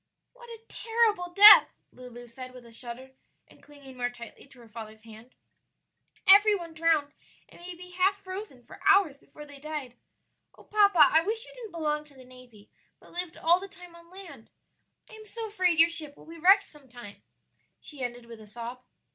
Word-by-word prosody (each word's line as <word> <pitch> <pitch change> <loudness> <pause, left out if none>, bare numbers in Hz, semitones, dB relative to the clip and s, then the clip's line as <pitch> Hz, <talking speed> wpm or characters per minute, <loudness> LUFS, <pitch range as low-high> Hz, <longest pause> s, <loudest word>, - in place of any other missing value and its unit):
"What 485 -1 -16
a 455 -1 -11
terrible 445 -6 -1
death!" 415 +4 +9 0.2
Lulu 245 -1 -12
said 255 +2 -11
with 250 -1 -14
a 235 - -16
shudder, 245 +3 -8 0.4
and - - -21
clinging 280 -3 -15
more 245 0 -2
tightly 235 +2 -13
to 265 -2 -20
her 230 - -16
father's 220 -1 -11
hand; 225 +2 -16 0.9
"every 410 +2 +6
one 340 -4 -8
drowned 310 -2 0 0.3
and - - -18
may 355 0 -9
be 360 +1 -13
half 370 +2 +1
frozen 370 - -9
for - - -15
hours 390 -8 +3
before 300 -1 -14
they 285 -1 -14
died. 295 -4 -7 0.6
Oh, - - -17
papa, 405 -5 +3
I 320 - +4
wish 445 +6 -3
you - - -15
didn't 470 -6 -11
belong 300 -2 -2
to 290 -2 -21
the 260 -1 -16
navy, 250 -5 -17 0.3
but - - -20
lived 355 -1 -6
all 345 +2 +2
the 390 - -9
time 360 -2 -14
on 340 0 -18
land! 345 - -13 0.6
I - - -18
am 435 0 -13
so 455 +1 -7
afraid 365 -5 0
your 330 +1 +6
ship 310 -4 -6
will - - -17
be 330 +1 -12
wrecked 390 +4 +5
some 295 -7 -19
time," 240 -4 -13 0.6
she 290 -3 -10
ended 245 -1 -6
with 230 -1 -13
a 215 - -14
sob. 235 +3 -9
310 Hz, 195 wpm, -27 LUFS, 250-375 Hz, 0.9 s, death